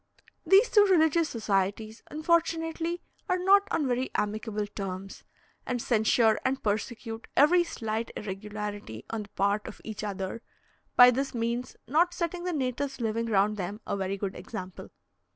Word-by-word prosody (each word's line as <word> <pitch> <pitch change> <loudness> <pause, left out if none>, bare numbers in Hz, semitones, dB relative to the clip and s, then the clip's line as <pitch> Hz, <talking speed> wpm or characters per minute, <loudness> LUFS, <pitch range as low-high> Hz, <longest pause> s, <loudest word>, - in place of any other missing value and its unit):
These 390 +7 +6
two 415 -2 +7
religious 330 -3 +3
societies, 215 0 -1
unfortunately, 330 +1 0 0.3
are 365 - +3
not 395 +2 +5
on 295 - 0
very 255 +1 0
amicable 210 0 -1
terms, 195 -1 -6 0.4
and 250 -1 -2
censure 220 -1 +3
and 265 +1 -1
persecute 225 +2 -3
every 345 +5 +6
slight 225 -8 -3
irregularity 205 - -6
on 225 -1 -2
the 205 - -10
part 200 +1 0
of - - -9
each 215 -1 -6
other; 195 +1 -4 0.5
by 245 0 +9
this 270 +1 -2
means 235 +2 -2
not 345 +5 +2
setting 345 +1 -3
the 360 - 0
natives 270 -1 -2
living 230 0 -1
round 210 0 +2
them 200 +2 -4
a - - -2
very 195 0 -2
good 195 -1 -4
example. 185 0 -8
230 Hz, 150 wpm, -28 LUFS, 205-310 Hz, 0.5 s, by